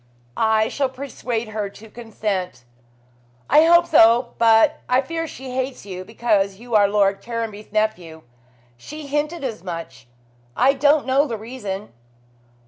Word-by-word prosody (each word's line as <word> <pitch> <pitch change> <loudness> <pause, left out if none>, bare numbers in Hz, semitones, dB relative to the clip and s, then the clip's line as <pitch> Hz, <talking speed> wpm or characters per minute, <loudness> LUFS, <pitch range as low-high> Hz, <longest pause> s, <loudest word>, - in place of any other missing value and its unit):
"I 220 -1 +2
shall 275 -2 -1
persuade 250 -4 -5
her 210 -2 -3
to 210 +2 -14
consent." 210 - -4 0.8
"I 310 - +6
hope 340 +1 +6
so; 235 -5 +4
but 230 +7 +4
I 250 +1 +4
fear 330 +4 -4
she 265 -3 -9
hates 260 -2 -4
you 185 -2 -7
because 205 -2 0
you 235 +3 -11
are 205 -2 +5
Lord 200 -1 +1
Caranby's 225 -3 -6
nephew. 180 -7 -2 0.5
She 300 - -9
hinted 295 +3 -2
as 225 -9 -5
much. 165 -8 -8 0.5
I 265 +2 +4
don't 290 +2 +3
know 275 +3 +2
the 230 -4 -4
reason." 210 - -7
225 Hz, 140 wpm, -21 LUFS, 205-265 Hz, 0.8 s, I